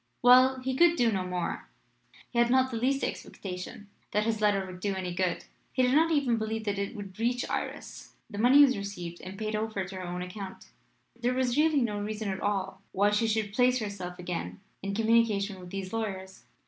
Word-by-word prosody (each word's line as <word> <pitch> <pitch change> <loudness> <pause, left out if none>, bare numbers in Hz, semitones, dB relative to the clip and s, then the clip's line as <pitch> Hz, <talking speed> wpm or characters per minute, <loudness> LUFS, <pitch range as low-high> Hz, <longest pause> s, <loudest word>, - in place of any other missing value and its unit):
Well; 255 +1 +7
he 260 0 -2
could 340 +4 +5
do 240 -7 +3
no 190 -3 -1
more. 180 -1 -3 0.6
He 235 - 0
had 235 0 +4
not 260 +1 +3
the 230 - -2
least 270 +4 +1
expectation 185 +2 -6 0.2
that 210 - +1
his 220 -1 -1
letter 200 -2 +2
would 185 -1 -9
do 200 +1 -1
any 185 -2 -3
good; 180 -1 -1 0.3
he 255 - +1
did 250 +1 +3
not 320 +3 +5
even 270 -7 +2
believe 220 0 -2
that 205 -2 -2
it 200 +4 -3
would 200 -2 -8
reach 245 +2 0
Iris. - - -5
The 205 - -7
money 260 +6 +7
was 260 -2 +4
received 180 -4 -6
and 190 +1 -8
paid 215 0 -2
over 215 -3 -2
to 190 +1 -9
her 185 - -5
own 180 0 -4
account. 190 +1 -8 0.5
There 245 +1 -1
was 255 -2 +1
really 305 -2 +3
no 210 -4 -1
reason 210 0 -3
at 190 0 -3
all 195 -1 -2
why 205 +2 +3
she 210 +2 +2
should 215 -2 -1
place 250 +2 +4
herself 200 -5 -5
again 170 - -5 0.2
in 200 0 -3
communication 220 -3 +2
with 180 -1 -10
these 195 +1 -5
lawyers. 190 -4 -4
210 Hz, 210 wpm, -29 LUFS, 190-245 Hz, 0.6 s, Well